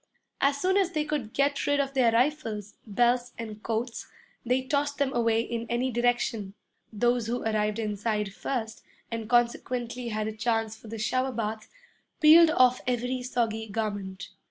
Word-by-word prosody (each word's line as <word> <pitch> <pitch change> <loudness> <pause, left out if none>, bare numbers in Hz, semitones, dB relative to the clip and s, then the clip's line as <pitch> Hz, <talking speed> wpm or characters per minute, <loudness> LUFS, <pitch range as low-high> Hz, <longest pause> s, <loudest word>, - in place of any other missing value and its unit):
As 280 0 +3
soon 375 +5 +2
as 375 -3 +1
they 305 -2 0
could 290 -8 -3
get 280 +2 0
rid 285 0 +2
of 275 -1 -1
their 250 -4 +4
rifles, 230 -5 0
belts, 245 +3 +1
and 215 -2 -7
coats, 230 +2 -3 0.4
they 250 +2 +1
tossed 285 +1 -1
them 275 -1 0
away 230 -1 +2
in 235 0 -4
any 250 +2 0
direction. 235 -4 0 0.4
Those 240 +1 +1
who 245 +2 -2
arrived 215 -1 0
inside 210 -1 -2
first, 225 -1 -4 0.3
and 225 -1 -4
consequently 240 0 0
had 215 -1 -2
a - - -2
chance 225 -1 0
for 220 - -15
the 225 +1 -6
shower 255 +4 0
bath, 220 -2 -4 0.5
peeled 320 +1 +8
off 255 -5 +4
every 250 +1 -1
soggy 230 -3 -1
garment. 200 -3 -4
235 Hz, 160 wpm, -28 LUFS, 220-255 Hz, 0.5 s, peeled